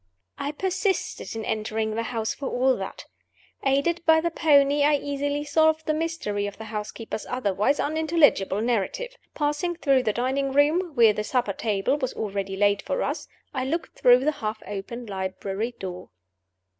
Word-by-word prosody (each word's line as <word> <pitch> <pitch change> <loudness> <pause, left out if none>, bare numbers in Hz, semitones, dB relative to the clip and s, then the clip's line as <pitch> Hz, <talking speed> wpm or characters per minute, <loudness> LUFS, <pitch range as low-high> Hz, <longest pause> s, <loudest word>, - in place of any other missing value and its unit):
I 285 - -2
persisted 375 - -2
in 220 -1 -4
entering 220 0 -1
the 225 - -1
house, 225 -1 -2
for 275 - -5
all 260 +1 +2
that. - - -6 0.6
Aided 280 +6 +1
by 320 -1 +5
the 340 +1 -1
pony, 285 -2 +4
I 295 +1 +5
easily 285 +1 -2
solved 315 +1 +2
the 310 - +1
mystery 305 -11 -2
of 205 - -8
the 220 - -7
housekeeper's 220 +1 -5
otherwise 230 +2 0
unintelligible 300 - +2
narrative. 245 - -1 0.2
Passing 295 +4 -1
through 275 -5 +3
the 225 -4 +1
dining 265 +4 -1
room 310 +4 +2
(where 230 -3 +6
the 210 - -2
supper 235 -3 0
table 215 +6 0
was 260 -3 -2
already 195 -2 -3
laid 205 0 +2
for - - -2
us), - - -3 0.3
I 260 -2 -1
looked 325 +6 -3
through 250 +1 +6
the 305 - +4
half 215 0 -3
opened 215 +4 -6
library 195 +4 -3
door. 180 -4 -7
255 Hz, 165 wpm, -25 LUFS, 215-295 Hz, 0.6 s, where